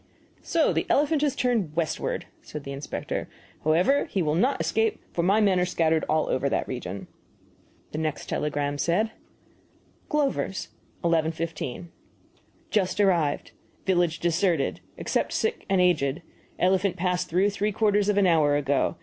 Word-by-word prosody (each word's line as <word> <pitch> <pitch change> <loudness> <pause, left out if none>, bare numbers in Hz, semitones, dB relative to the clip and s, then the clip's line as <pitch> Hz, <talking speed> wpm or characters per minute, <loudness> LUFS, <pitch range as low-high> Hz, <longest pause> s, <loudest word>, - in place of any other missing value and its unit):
"So 330 -2 +2
the - - -1
elephant 295 +1 +3
has 290 -3 +1
turned 225 -11 0
westward," 165 -2 -1 0.2
said 150 -1 -8
the 140 - -6
inspector. 140 +1 -4 0.3
"However, 180 - +3
he 190 - -1
will 150 -1 +1
not 245 - +2
escape, 225 0 +1
for 170 - 0
my 195 +5 +3
men 195 -4 +3
are - - +3
scattered 160 -3 +1
all 155 0 +2
over 140 +2 0
that - - -1
region." 100 -6 -5 0.9
The 155 - -3
next 155 -2 -2
telegram 145 -1 -2
said: 205 +8 +1 1.0
GLOVER'S, 275 -10 -1 0.3
11.15 165 -1 -1 0.8
Just 200 -1 +1
arrived. 175 -7 +2 0.3
Village 175 -3 +2
deserted, 170 -3 +1 0.2
except - - -1
sick 450 +1 -1
and 195 -1 +3
aged. 170 -3 +2 0.3
Elephant 190 +1 +2
passed 180 0 0
through 190 +5 +2
three 205 +1 -1
quarters 205 -1 +2
of 205 - +2
an 200 - +5
hour 155 -5 +4
ago. 140 +2 +1
175 Hz, 145 wpm, -26 LUFS, 155-205 Hz, 1.0 s, an